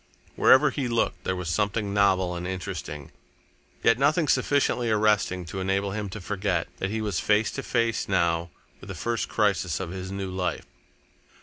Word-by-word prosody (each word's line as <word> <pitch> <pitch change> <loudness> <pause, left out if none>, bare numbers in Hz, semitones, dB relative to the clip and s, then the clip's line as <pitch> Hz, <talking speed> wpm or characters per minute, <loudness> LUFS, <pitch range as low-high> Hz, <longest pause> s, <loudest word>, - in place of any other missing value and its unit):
Wherever 140 +2 +6
he 135 -2 -2
looked, 115 -1 -1
there 95 - 0
was 90 -2 -5
something 100 +3 -1
novel 95 -3 +3
and 85 +1 -4
interesting, 80 -5 -6 0.7
yet 115 +1 +4
nothing 150 +3 +3
sufficiently 135 -5 +2
arresting 105 -4 +2
to 95 +3 -6
enable 95 +1 0
him 105 0 -4
to 105 - -7
forget 95 -3 -1
that 95 - -2
he 110 +2 -2
was 105 -5 -1
face 105 0 +2
to 135 - -4
face 115 -5 0
now 85 -2 +1 0.3
with - - -12
the 95 - -6
first 115 +6 -2
crisis 95 -7 +1
of 95 -3 -4
his 95 0 -6
new 100 -1 -4
life. 90 -1 -2
100 Hz, 175 wpm, -26 LUFS, 90-110 Hz, 0.7 s, Wherever